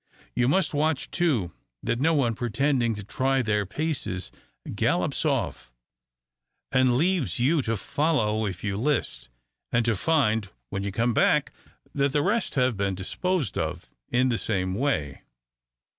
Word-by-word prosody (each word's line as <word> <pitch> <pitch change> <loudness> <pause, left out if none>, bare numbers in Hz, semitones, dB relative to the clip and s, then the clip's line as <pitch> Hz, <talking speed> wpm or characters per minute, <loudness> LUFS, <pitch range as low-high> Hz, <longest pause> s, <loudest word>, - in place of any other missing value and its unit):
You 125 0 +2
must 185 +6 +2
watch, 150 -1 0
too, 135 - +1 0.3
that 120 - 0
no 160 +4 +3
one, 125 -6 +2
pretending 120 0 0
to 105 - -6
try 130 +6 0
their 105 -3 0
paces, 110 - -3 0.4
gallops - - 0
off, - - -1 1.0
and 130 -2 +3
leaves 175 0 +1
you 140 +6 +3
to 115 -3 -1
follow 110 - 0
if 95 -3 -6
you 100 -2 -1
list, 110 - -1 0.4
and 120 -1 +2
to 115 -2 +2
find, 110 -6 +1 0.2
when 100 - -2
you 100 0 -3
come 115 +4 +1
back, - - +3 0.4
that 140 -1 +1
the 145 -1 +2
rest 210 +3 0
have 125 -3 +2
been 100 -1 -1
disposed 170 - -2
of - - -4 0.2
in 130 +1 +2
the 115 - 0
same 95 -4 -1
way." 95 - -1
120 Hz, 150 wpm, -26 LUFS, 105-145 Hz, 1.0 s, no